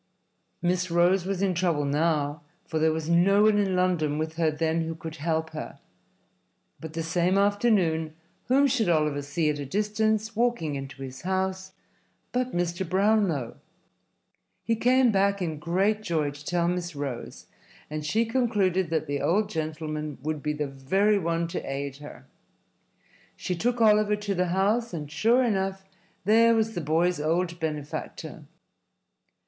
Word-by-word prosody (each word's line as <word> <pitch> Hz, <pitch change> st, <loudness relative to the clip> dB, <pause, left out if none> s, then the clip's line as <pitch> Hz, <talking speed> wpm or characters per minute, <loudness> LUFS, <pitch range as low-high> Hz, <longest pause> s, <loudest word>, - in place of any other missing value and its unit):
Miss 180 Hz, +1 st, +1 dB
Rose 175 Hz, +2 st, +3 dB
was 195 Hz, 0 st, -1 dB
in 190 Hz, -2 st, +2 dB
trouble 170 Hz, -4 st, 0 dB
now, 150 Hz, 0 st, 0 dB, 0.2 s
for 160 Hz, -, -2 dB
there 160 Hz, 0 st, +3 dB
was 160 Hz, 0 st, -3 dB
no 185 Hz, +5 st, +4 dB
one 215 Hz, -1 st, +4 dB
in 195 Hz, -2 st, +1 dB
London 175 Hz, -5 st, +1 dB
with 155 Hz, +1 st, -3 dB
her 165 Hz, -2 st, +2 dB
then 160 Hz, +1 st, 0 dB
who 165 Hz, 0 st, -3 dB
could 160 Hz, 0 st, -8 dB
help 160 Hz, +1 st, -1 dB
her. 155 Hz, -, -7 dB, 1.0 s
But 160 Hz, -1 st, -8 dB
the 165 Hz, 0 st, -3 dB
same 175 Hz, +3 st, +1 dB
afternoon, 200 Hz, -7 st, +2 dB, 0.3 s
whom 275 Hz, +3 st, +4 dB
should 240 Hz, -8 st, +1 dB
Oliver 150 Hz, -3 st, +1 dB
see 145 Hz, +3 st, -1 dB
at 145 Hz, -, -5 dB
a -, -, -3 dB
distance, 215 Hz, -, 0 dB
walking 235 Hz, -10 st, 0 dB
into 135 Hz, 0 st, -6 dB
his 130 Hz, -1 st, -8 dB
house, 190 Hz, 0 st, -2 dB, 0.6 s
but 250 Hz, 0 st, -1 dB
Mr. 175 Hz, 0 st, -1 dB
Brownlow. 190 Hz, -, +1 dB, 1.1 s
He 230 Hz, -, +1 dB
came 250 Hz, +2 st, +4 dB
back 200 Hz, 0 st, +2 dB
in 160 Hz, -5 st, -3 dB
great 195 Hz, +7 st, +1 dB
joy 160 Hz, -7 st, -1 dB
to 145 Hz, +1 st, -13 dB
tell 170 Hz, 0 st, 0 dB
Miss 175 Hz, -2 st, -2 dB
Rose, 140 Hz, -4 st, -6 dB, 0.4 s
and 155 Hz, 0 st, -5 dB
she 215 Hz, +10 st, +1 dB
concluded 205 Hz, -7 st, +1 dB
that 160 Hz, -1 st, 0 dB
the 145 Hz, -1 st, -3 dB
old 205 Hz, +4 st, +1 dB
gentleman 155 Hz, -2 st, -4 dB
would 155 Hz, -1 st, -2 dB
be 150 Hz, +1 st, -1 dB
the 150 Hz, 0 st, -2 dB
very 190 Hz, +10 st, +1 dB
one 170 Hz, -1 st, -1 dB
to -, -, -3 dB
aid 140 Hz, 0 st, -4 dB
her. 145 Hz, 0 st, -11 dB, 1.1 s
She 180 Hz, -, -3 dB
took 240 Hz, +7 st, -1 dB
Oliver 210 Hz, -1 st, +4 dB
to 210 Hz, -1 st, -3 dB
the 180 Hz, -1 st, 0 dB
house, 200 Hz, +4 st, +1 dB
and, 150 Hz, -2 st, -6 dB
sure 235 Hz, +9 st, +3 dB
enough, 195 Hz, -4 st, -1 dB, 0.4 s
there 230 Hz, +3 st, +5 dB
was 225 Hz, 0 st, +1 dB
the 175 Hz, -, -3 dB
boy's 165 Hz, +3 st, +1 dB
old 170 Hz, +2 st, 0 dB
benefactor. 150 Hz, -3 st, -5 dB
175 Hz, 160 wpm, -26 LUFS, 155-205 Hz, 1.1 s, there